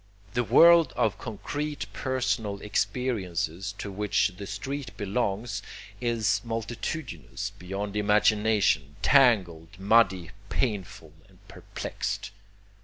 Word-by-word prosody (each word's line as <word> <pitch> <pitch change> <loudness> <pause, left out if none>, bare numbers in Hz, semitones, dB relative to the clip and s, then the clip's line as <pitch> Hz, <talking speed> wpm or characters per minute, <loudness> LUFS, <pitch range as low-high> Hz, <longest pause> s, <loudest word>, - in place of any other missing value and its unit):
The 120 - +1
world 165 - +6
of 105 -3 0
concrete 145 +7 -4
personal 120 -6 -1
experiences 100 -5 -2
to 100 - -5
which 105 0 +1
the 100 +1 -8
street 130 +6 -5
belongs 100 0 -2 0.4
is 110 -4 +1
multitudinous 115 - -4
beyond 100 +3 -5
imagination, 105 -7 +2
tangled, 100 - +3
muddy, 95 -4 +3 0.2
painful 95 - -3 0.2
and - - -22
perplexed. - - -5
105 Hz, 95 wpm, -27 LUFS, 95-120 Hz, 0.4 s, world